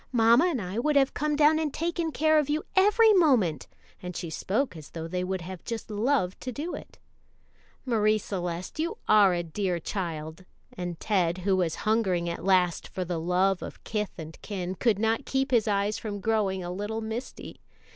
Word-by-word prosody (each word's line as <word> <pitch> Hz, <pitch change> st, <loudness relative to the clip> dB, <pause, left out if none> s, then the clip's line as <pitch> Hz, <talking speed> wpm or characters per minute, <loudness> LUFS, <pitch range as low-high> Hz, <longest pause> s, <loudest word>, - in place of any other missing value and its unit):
Mamma 235 Hz, +4 st, +5 dB
and 335 Hz, -8 st, 0 dB
I 190 Hz, +2 st, -3 dB
would 300 Hz, +4 st, +1 dB
have 275 Hz, -1 st, +4 dB
come 300 Hz, 0 st, 0 dB
down 305 Hz, +1 st, +4 dB
and 310 Hz, -2 st, -1 dB
taken 335 Hz, +1 st, -2 dB
care 310 Hz, +1 st, +3 dB
of 295 Hz, -1 st, -1 dB
you 305 Hz, +2 st, 0 dB
every 420 Hz, +3 st, +6 dB
moment 245 Hz, -, +3 dB, 0.3 s
and 180 Hz, -1 st, -6 dB
she 170 Hz, -, -5 dB
spoke 210 Hz, -, -1 dB
as 155 Hz, -3 st, -10 dB
though 165 Hz, -1 st, -6 dB
they 180 Hz, +2 st, -2 dB
would 190 Hz, 0 st, -2 dB
have 180 Hz, 0 st, -8 dB
just 230 Hz, -2 st, -5 dB
loved 210 Hz, -3 st, 0 dB
to 255 Hz, -, -4 dB
do 300 Hz, +8 st, -5 dB
it. -, -, -9 dB, 0.9 s
"Marie 215 Hz, -3 st, +2 dB
Celeste, 180 Hz, -, -5 dB
you 330 Hz, +2 st, -1 dB
are 205 Hz, -4 st, +6 dB
a 175 Hz, -, -1 dB
dear 175 Hz, +1 st, -2 dB
child;" 160 Hz, -2 st, -5 dB, 0.3 s
and 175 Hz, -2 st, -5 dB
Ted, 180 Hz, -5 st, +1 dB
who 195 Hz, -1 st, +3 dB
was 175 Hz, -4 st, 0 dB
hungering 195 Hz, -6 st, +1 dB
at 170 Hz, -, -4 dB
last 185 Hz, -2 st, +2 dB
for 185 Hz, -, -4 dB
the 175 Hz, -1 st, -3 dB
love 180 Hz, +3 st, +1 dB
of -, -, -9 dB
kith 210 Hz, -3 st, -3 dB
and 160 Hz, -1 st, -9 dB
kin, 185 Hz, -3 st, -4 dB
could 215 Hz, +2 st, +1 dB
not 225 Hz, +2 st, +1 dB
keep 270 Hz, 0 st, -1 dB
his 230 Hz, -3 st, +3 dB
eyes 205 Hz, 0 st, 0 dB
from 205 Hz, -2 st, -5 dB
growing 200 Hz, -3 st, 0 dB
a 175 Hz, -, -4 dB
little 205 Hz, +4 st, -3 dB
misty. 225 Hz, +3 st, -6 dB
205 Hz, 195 wpm, -27 LUFS, 180-255 Hz, 0.9 s, every